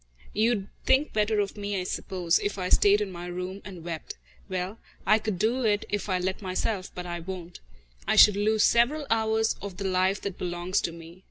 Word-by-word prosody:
You'd 215 Hz, -2 st, +1 dB, 0.2 s
think 275 Hz, +3 st, +3 dB
better 215 Hz, 0 st, +2 dB
of 200 Hz, -1 st, -1 dB
me, 205 Hz, -1 st, -2 dB
I -, -, -2 dB
suppose, 180 Hz, -2 st, 0 dB
if 205 Hz, 0 st, -2 dB
I 180 Hz, -1 st, -2 dB
stayed 205 Hz, +1 st, +5 dB
in 200 Hz, -2 st, -2 dB
my 175 Hz, 0 st, -7 dB
room 180 Hz, +2 st, -5 dB
and 185 Hz, -4 st, -9 dB
wept. 165 Hz, -2 st, -6 dB, 0.3 s
Well, 185 Hz, +3 st, -3 dB, 0.3 s
I 215 Hz, +3 st, +5 dB
could 215 Hz, -3 st, -3 dB
do 225 Hz, +7 st, +1 dB
it 205 Hz, -2 st, +2 dB
if 205 Hz, 0 st, -2 dB
I 185 Hz, -, +2 dB
let 185 Hz, +3 st, -2 dB
myself, 190 Hz, +1 st, -2 dB
but 180 Hz, -, -5 dB
I 175 Hz, -1 st, -4 dB
won't. 175 Hz, 0 st, -7 dB, 0.5 s
I -, -, +3 dB
should 210 Hz, -, +8 dB
lose 215 Hz, +1 st, +2 dB
several 275 Hz, +6 st, +3 dB
hours 220 Hz, 0 st, +2 dB
of 195 Hz, -3 st, -7 dB
the 200 Hz, -, -4 dB
life 185 Hz, +1 st, +2 dB
that 195 Hz, -2 st, -5 dB
belongs 175 Hz, +2 st, -1 dB
to 170 Hz, -, -2 dB
me. 165 Hz, +1 st, -12 dB
195 Hz, 205 wpm, -27 LUFS, 180-215 Hz, 0.5 s, should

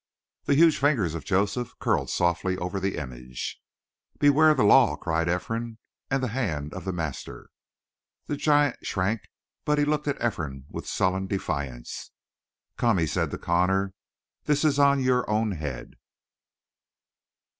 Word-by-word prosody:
The 140 Hz, -, +3 dB
huge 160 Hz, +1 st, +5 dB
fingers 125 Hz, -, +2 dB
of 85 Hz, -, -6 dB
Joseph 105 Hz, +5 st, 0 dB
curled -, -, 0 dB
softly 85 Hz, +2 st, 0 dB
over 90 Hz, +2 st, -3 dB
the 95 Hz, 0 st, -2 dB
image. 65 Hz, -4 st, -6 dB, 0.6 s
"Beware 145 Hz, +2 st, +5 dB
of 155 Hz, -, +3 dB
the 125 Hz, -, +3 dB
law!" 120 Hz, +3 st, +6 dB
cried 80 Hz, 0 st, -1 dB
Ephraim. 115 Hz, +6 st, -2 dB, 0.3 s
"And 135 Hz, 0 st, 0 dB
the 125 Hz, -, 0 dB
hand 80 Hz, -, -2 dB
of -, -, -7 dB
the 95 Hz, -, -1 dB
master!" 80 Hz, -6 st, -6 dB, 0.7 s
The 145 Hz, -, -2 dB
giant 145 Hz, -2 st, +2 dB
shrank, 100 Hz, +3 st, -1 dB, 0.4 s
but 150 Hz, 0 st, +1 dB
he 145 Hz, -, +3 dB
looked 150 Hz, 0 st, -1 dB
at 145 Hz, -, -1 dB
Ephraim 75 Hz, -, -3 dB
with -, -, -6 dB
sullen 95 Hz, +1 st, 0 dB
defiance. 70 Hz, -10 st, -4 dB, 0.7 s
"Come," 115 Hz, -4 st, +2 dB
he 85 Hz, -, +2 dB
said -, -, -1 dB
to -, -, -5 dB
Connor. 95 Hz, +3 st, +1 dB, 0.5 s
"This 150 Hz, +1 st, +2 dB
is 145 Hz, -2 st, +3 dB
on 140 Hz, -1 st, +4 dB
your 125 Hz, -2 st, +2 dB
own 110 Hz, 0 st, +1 dB
head." 75 Hz, -8 st, -5 dB
100 Hz, 150 wpm, -26 LUFS, 85-135 Hz, 0.7 s, law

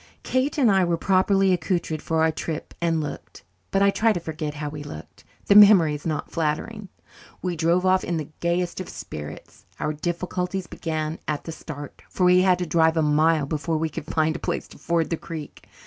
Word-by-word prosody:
Kate 260 Hz, +4 st, 0 dB
and 250 Hz, -7 st, +4 dB
I 190 Hz, -1 st, +4 dB
were 170 Hz, -1 st, +1 dB
properly 195 Hz, +1 st, +3 dB
accoutred 170 Hz, -3 st, -1 dB
for 160 Hz, -1 st, 0 dB
our 160 Hz, -, +3 dB
trip 155 Hz, 0 st, -5 dB
and 165 Hz, -2 st, +1 dB
looked 150 Hz, -, -8 dB, 0.3 s
but 195 Hz, -, +2 dB
I 200 Hz, -, +5 dB
try 225 Hz, +3 st, +2 dB
to 175 Hz, -, -2 dB
forget 155 Hz, -2 st, -5 dB
how 150 Hz, 0 st, -4 dB
we 145 Hz, 0 st, -6 dB
looked! 80 Hz, -, -10 dB, 0.2 s
The -, -, +4 dB
memory 200 Hz, -7 st, +8 dB
is 150 Hz, +2 st, -5 dB
not 155 Hz, -2 st, -3 dB
flattering. 170 Hz, +6 st, -2 dB, 0.5 s
We 180 Hz, -2 st, -1 dB
drove 170 Hz, +3 st, +2 dB
off 185 Hz, 0 st, +3 dB
in 170 Hz, -, -2 dB
the 155 Hz, -3 st, -5 dB
gayest 175 Hz, +1 st, -1 dB
of 185 Hz, -, -8 dB
spirits. 75 Hz, -1 st, -9 dB
Our 155 Hz, -, -1 dB
difficulties 180 Hz, +3 st, -3 dB
began 155 Hz, -1 st, -4 dB
at 150 Hz, -1 st, -2 dB
the 165 Hz, -, -6 dB
start, 145 Hz, -3 st, -9 dB
for 185 Hz, -, -2 dB
we 180 Hz, 0 st, +6 dB
had 185 Hz, -1 st, +4 dB
to 180 Hz, -, -2 dB
drive 160 Hz, 0 st, +3 dB
a 160 Hz, -, +3 dB
mile 155 Hz, 0 st, +3 dB
before 155 Hz, +2 st, -2 dB
we 160 Hz, +1 st, -1 dB
could 155 Hz, 0 st, -7 dB
find 160 Hz, 0 st, +1 dB
a -, -, -4 dB
place -, -, -3 dB
to -, -, -15 dB
ford 170 Hz, -1 st, 0 dB
the 165 Hz, -, 0 dB
creek. 155 Hz, -3 st, -9 dB
165 Hz, 210 wpm, -24 LUFS, 155-180 Hz, 0.5 s, memory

